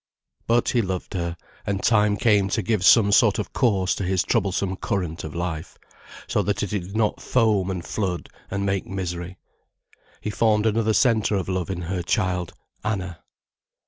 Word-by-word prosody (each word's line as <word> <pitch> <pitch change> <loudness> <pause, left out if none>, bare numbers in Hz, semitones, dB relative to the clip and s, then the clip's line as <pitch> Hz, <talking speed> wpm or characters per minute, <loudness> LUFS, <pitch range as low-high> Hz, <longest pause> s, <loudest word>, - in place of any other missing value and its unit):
But 120 +1 +3
he 120 - +2
loved 95 -3 -4
her, 85 -2 -3 0.3
and 100 -1 -2
time 105 -2 +3
came 105 -4 +3
to 110 - 0
give 110 -5 0
some 100 +1 +6
sort 110 -1 +5
of 105 - -4
course 95 -7 +2
to - - -3
his 95 0 +1
troublesome 95 -3 0
current 90 -6 -3
of 80 0 -7
life, 85 -2 -4 0.5
so - - 0
that 105 0 -1
it 100 - -3
did 100 0 -3
not 110 -2 +1
foam 110 -6 +2
and 90 -3 -4
flood 95 -5 -2 0.2
and 100 +1 -2
make 95 -1 -1
misery. 90 -1 -4 0.8
He 105 - -4
formed 105 0 +2
another 110 0 +2
centre 110 -4 +3
of 95 - -2
love 95 -3 -2
in 90 -2 -3
her 90 +1 -2
child, 90 -2 -1 0.3
Anna. 95 -5 -3
95 Hz, 175 wpm, -24 LUFS, 90-105 Hz, 0.8 s, some